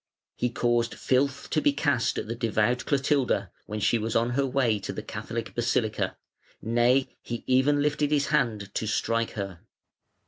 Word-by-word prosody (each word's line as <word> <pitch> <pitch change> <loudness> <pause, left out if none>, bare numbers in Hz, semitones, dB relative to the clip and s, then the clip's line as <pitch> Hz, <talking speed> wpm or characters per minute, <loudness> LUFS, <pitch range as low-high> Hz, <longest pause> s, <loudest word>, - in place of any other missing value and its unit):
He 125 - 0
caused 120 -1 0
filth 140 +1 0
to 155 - +2
be 145 - +3
cast 145 -5 +1
at - - -3
the 115 - -2
devout 115 +1 0
Clotilda, 140 -1 +1 0.2
when 105 +1 -4
she 110 +3 +2
was 110 +1 -3
on 115 +1 +2
her 135 +2 +1
way 125 -5 +1
to - - -5
the - - -6
Catholic - - -5
basilica, - - 0 0.4
nay, 120 +4 +2
he 120 -1 -5
even 140 +3 +3
lifted 150 0 +1
his 145 -1 +1
hand 110 -9 0
to 110 - -2
strike 115 +1 0
her. 100 -4 -5
120 Hz, 170 wpm, -27 LUFS, 115-140 Hz, 0.4 s, be